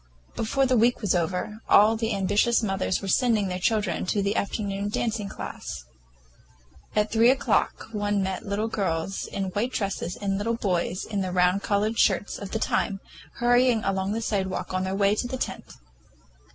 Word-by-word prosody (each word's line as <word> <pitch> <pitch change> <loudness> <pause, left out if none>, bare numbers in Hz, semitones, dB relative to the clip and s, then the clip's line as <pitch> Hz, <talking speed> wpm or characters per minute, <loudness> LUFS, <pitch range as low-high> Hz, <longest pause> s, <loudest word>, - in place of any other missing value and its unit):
Before 270 +5 +1
the 255 -1 +2
week 240 +2 +3
was 205 -5 +1
over, 180 +5 -1
all 215 +2 +6
the 225 -1 -1
ambitious 205 +5 +2
mothers 195 -1 -1
were - - -4
sending 215 -2 +2
their 180 0 -3
children 210 -3 0
to 200 +2 +1
the 200 +2 0
afternoon 200 -1 -2
dancing 215 -1 -2
class. 65 - -7 1.1
At 210 0 +1
three 230 +2 +5
o'clock 265 +1 +1
one 205 -2 0
met 190 0 -3
little 205 +1 -1
girls 190 -4 -2
in 190 -1 -3
white 225 +7 -1
dresses 195 -4 -2
and 195 -1 -2
little 230 +3 0
boys 185 -3 -1
in 205 -2 -2
the 185 -1 -2
round 180 +2 +3
collared 215 +3 0
shirts 205 - +2
of 200 - -6
the 220 - -2
time, 200 -2 0 0.3
hurrying 245 -1 +3
along 195 +1 -1
the 225 - -2
sidewalk 190 -3 -2
on 185 0 0
their 190 +1 -2
way 200 0 +3
to 230 +3 -1
the 260 - -4
tent. - - -5
205 Hz, 180 wpm, -26 LUFS, 190-225 Hz, 1.1 s, all